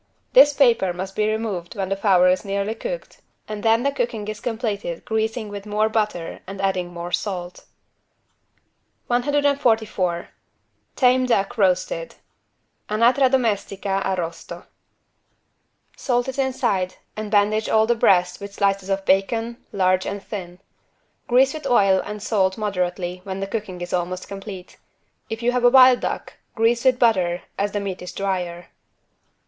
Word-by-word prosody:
This 295 -13 +8
paper 235 -10 +3
must 190 +2 -6
be 215 0 +1
removed 215 -6 -3
when 195 -2 -3
the 195 - 0
fowl 195 -3 +3
is 185 +2 +3
nearly 200 +1 -2
cooked, - - -7 0.3
and 215 -1 -5
then 225 +2 +3
the 280 - +2
cooking 230 -6 -3
is 215 0 -5
completed 215 -7 -3
greasing 220 +1 -1
with 205 0 -8
more 210 +1 +1
butter 210 -6 -2
and 195 +1 -7
adding 185 -2 -1
more 175 0 -6
salt. 180 -1 -4 1.4
144 245 -9 +1 0.7
TAME 255 0 +3
DUCK 200 -4 +1
ROASTED 185 -5 0 0.7
(Anatra 240 +5 +4
domestica 200 -6 0
arrosto) 170 -2 -4 1.3
Salt 245 -2 0
it 265 +1 -4
inside 240 -9 0 0.2
and 215 0 -5
bandage 210 +1 +2
all 220 0 +4
the 240 - +3
breast 180 -5 +2
with 200 0 -8
slices 195 -1 0
of 195 0 -1
bacon, 225 +5 +1
large 185 -1 +1
and 200 0 -5
thin. 180 -4 -7 0.7
Grease 260 +2 +4
with 310 -3 -5
oil 195 -6 +4
and 210 0 -7
salt 190 -4 +1
moderately 180 -3 -2
when 190 0 -5
the 195 - -2
cooking 195 -3 -5
is 175 - -5
almost 180 +1 -2
complete. 195 -2 -9 0.5
If 225 +1 -5
you 245 - +3
have 250 0 -1
a 245 - +7
wild 255 -1 +7
duck - - -4 0.2
grease 235 +2 +2
with 255 -1 +4
butter, 185 -8 +2 0.2
as 200 0 -1
the 205 - 0
meat 195 -2 -5
is 180 - -7
drier. 180 -3 -3
205 Hz, 150 wpm, -22 LUFS, 185-230 Hz, 1.4 s, This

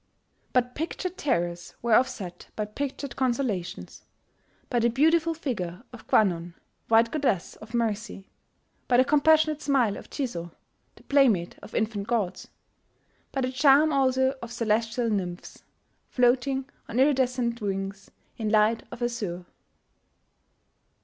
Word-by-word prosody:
But 250 0 +1
pictured 345 +4 -4
terrors 175 - -2
were 235 -2 +2
offset 215 -8 0
by 215 - -2
pictured 275 +5 -5
consolations, 235 -9 -2 0.6
by 245 - 0
the 235 +1 +3
beautiful 320 +6 +3
figure 215 - -4
of 240 - -12
Kwannon, 175 -4 +2 0.3
white 230 +1 +4
Goddess 270 - -1
of 225 +2 -9
Mercy, 215 -3 -2 0.6
by 245 - +4
the 255 - +5
compassionate 305 +1 +3
smile 255 -9 +2
of - - -11
Jizo, 175 - -4 0.4
the - - -19
playmate 240 -12 +2
of - - -11
infant 215 -2 -1
ghosts, 205 -6 -1 0.8
by 270 - -2
the 255 0 -1
charm 285 +3 +5
also 260 -1 +2
of 235 0 -7
celestial 230 0 0
nymphs, 180 -3 -4 0.5
floating 260 +2 +2 0.2
on 235 - -1
iridescent 255 -4 +2
wings 195 -1 -4 0.3
in 220 -2 -1
light 215 +1 +3
of 240 0 -6
azure. 205 -7 -3
235 Hz, 125 wpm, -26 LUFS, 210-265 Hz, 0.8 s, the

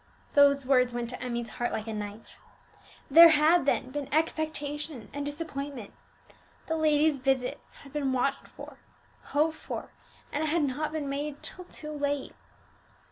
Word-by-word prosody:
Those 280 -2 +5
words 250 -2 +3
went 240 0 -3
to 250 - -7
Emmie's 240 -2 -3
heart 240 - +1
like 215 - -3
a 225 - -5
knife. 210 +1 -7 0.7
There 335 +3 +11
had, 315 0 +4
then, 255 -2 +1
been 285 0 -5
expectation 300 -3 -2
and 285 0 -3
disappointment; 285 -6 -5 0.7
the 320 - -1
lady's 305 -2 +3
visit 265 +1 0 0.2
had 275 -1 -14
been 285 -3 0
watched 265 +2 0
for, - - -12 0.5
hoped 315 +2 +1
for, - - -6 0.4
and 295 - -1
it - - 0
had 320 +1 +1
not 290 +3 -1
been 305 -2 -3
made 285 +1 -4
till 365 - -7
too 305 -3 -8
late! 285 -2 -2
285 Hz, 155 wpm, -28 LUFS, 260-305 Hz, 0.7 s, There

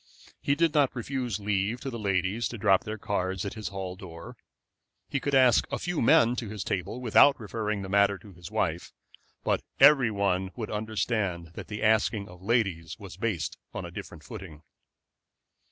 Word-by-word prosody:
He 140 - +1
did 165 0 +2
not 145 -4 +3
refuse 125 -3 -3
leave 105 +3 0
to 135 - -4
the 115 - -5
ladies 100 +2 0
to 120 - -7
drop 95 -2 +3
their 110 +1 -4
cards 95 -2 -2
at 100 - -4
his 110 -2 -5
hall 95 -2 -5
door. 85 -3 -10 0.7
He 140 - -1
could 140 +1 0
ask 130 -4 +5
a - - 0
few 175 -2 -2
men 115 +1 +5
to 115 -4 -4
his 105 -2 -4
table 95 +6 -3
without 125 +4 +5
referring 105 -2 -3
the - - -5
matter 100 0 +3
to 100 0 -15
his 85 0 -10
wife; 90 -6 -2 0.5
but - - +1 0.2
every 135 -4 +7
one 95 -3 0
would 115 -3 -5
understand 105 -5 -2
that - - -8
the 105 0 -5
asking 110 -1 +2
of 90 0 -13
ladies 95 -7 0
was 100 -6 -10
based 100 -3 -2 0.2
on - - -4
a 85 - -8
different 85 -5 -9
footing. 80 -2 -10
105 Hz, 185 wpm, -28 LUFS, 95-115 Hz, 0.7 s, every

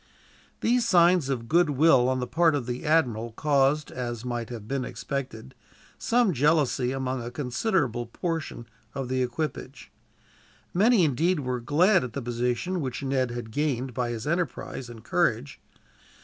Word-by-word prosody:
These 240 0 +2
signs 175 -6 +4
of 120 -4 -3
goodwill 145 -4 +4
on 130 0 0
the 125 - -2
part 165 +2 +2
of 135 -4 -2
the 125 +3 -5
admiral 120 -8 +1
caused, 145 +2 +1
as 120 -2 -5
might 120 -1 -3
have 115 -4 -8
been 135 0 -2
expected, 125 - -5 0.5
some 235 -5 +2
jealousy 145 -3 +2
among 130 -1 -2
a 120 - -5
considerable 125 - -1
portion 165 -2 -4 0.3
of 135 -2 -4
the 130 0 0
equipage. 130 0 -4 0.8
Many, 210 +2 +4
indeed, 160 +3 +1
were 125 -2 -2
glad 165 - +3
at 125 -3 -6
the 140 - -4
position 125 +9 -1
which 130 0 -4
Ned 130 -2 0
had 120 -2 -6
gained 135 -2 -1
by 125 0 -2
his 115 -2 -5
enterprise 155 -6 -3
and 115 -2 -11
courage. 70 - 0
130 Hz, 150 wpm, -26 LUFS, 120-160 Hz, 0.8 s, signs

